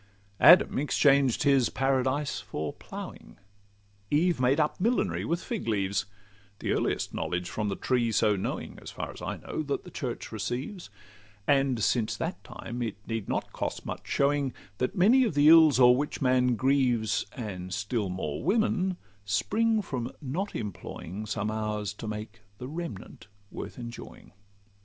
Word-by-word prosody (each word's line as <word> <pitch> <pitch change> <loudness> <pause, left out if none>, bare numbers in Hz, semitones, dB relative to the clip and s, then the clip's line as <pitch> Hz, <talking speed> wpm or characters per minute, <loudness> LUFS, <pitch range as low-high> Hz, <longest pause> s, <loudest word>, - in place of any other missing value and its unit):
Adam 180 -2 +7
exchanged 140 -3 +3
his 135 -3 +4
Paradise 135 +2 0
for 75 0 -5
ploughing, - - -9 0.7
Eve 165 +1 +2
made 130 +4 +3
up 150 0 +1
millinery 235 +5 +1
with 170 +2 -1
fig 235 - -4
leaves— 100 -2 0 0.5
The - - -2
earliest - - 0
knowledge 90 0 -2
from 105 +3 -2
the 100 - -2
tree 120 0 +1
so 105 -1 +3
knowing, 95 - -4
As - - -8
far - - -5
as - - -12
I - - -3
know, - - -4
that 145 -2 -2
the 180 - -11
church 125 -6 -5
receives: 120 - -4 0.6
And 135 -4 +2
since 110 -3 +1
that 165 +8 -4
time 120 +1 -7
it 115 -3 -3
need 115 -3 -4
not - - -2
cost - - -4
much - - -6
showing, 140 -2 +1 0.3
That 125 - -1
many 230 +9 +5
of 220 - -1
the 145 +1 +6
ills 160 -4 +8
o'er 125 -1 +8
which 145 +3 -2
man 125 -2 +3
grieves, 125 -4 +1
And 95 -6 -6
still 100 +2 -1
more 75 -5 -3
women, 195 -4 +1 0.3
spring 215 - +1
from 125 -5 -4
not 165 +9 -3
employing 105 -1 -6
Some 105 +1 -2
hours 105 -2 -2
to 110 +2 -8
make 105 +1 -6 0.2
the 125 - -7
remnant 150 - -7 0.2
worth - - -7
enjoying. 120 -1 -9
125 Hz, 155 wpm, -28 LUFS, 105-150 Hz, 0.7 s, ills